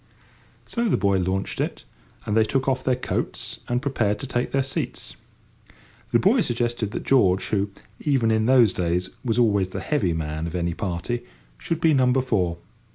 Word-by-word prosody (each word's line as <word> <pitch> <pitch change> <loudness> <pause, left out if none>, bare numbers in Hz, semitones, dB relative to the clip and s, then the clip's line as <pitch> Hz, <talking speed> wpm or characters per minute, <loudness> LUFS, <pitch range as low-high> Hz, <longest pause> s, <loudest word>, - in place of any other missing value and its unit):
So 235 -1 -1
the - - +3
boy 100 -1 +2
launched 95 +2 -1
it, - - -3 0.4
and 105 - -1
they 110 - +5
took 130 +4 -1
off 130 -1 +1
their 130 - +2
coats 125 - -3
and 120 +2 -1
prepared 110 -7 0
to - - -4
take 125 -1 -2
their 135 0 +2
seats. 130 - -4 1.0
The - - +5
boy - - +4
suggested 120 -2 -1
that - - -5
George, 95 -9 +3
who, 100 -1 0 0.3
even 130 -6 +2
in 110 0 +2
those 125 -6 +5
days, 90 +1 -1
was 115 -3 0
always 100 -6 +3
the - - -5
heavy 115 - 0
man 80 0 -3
of 85 - -6
any 85 -1 -1
party, 95 +6 -3 0.4
should 165 - -2
be 160 -1 +4
number 130 -1 +3
four. 90 -9 0
110 Hz, 180 wpm, -24 LUFS, 95-130 Hz, 1.0 s, they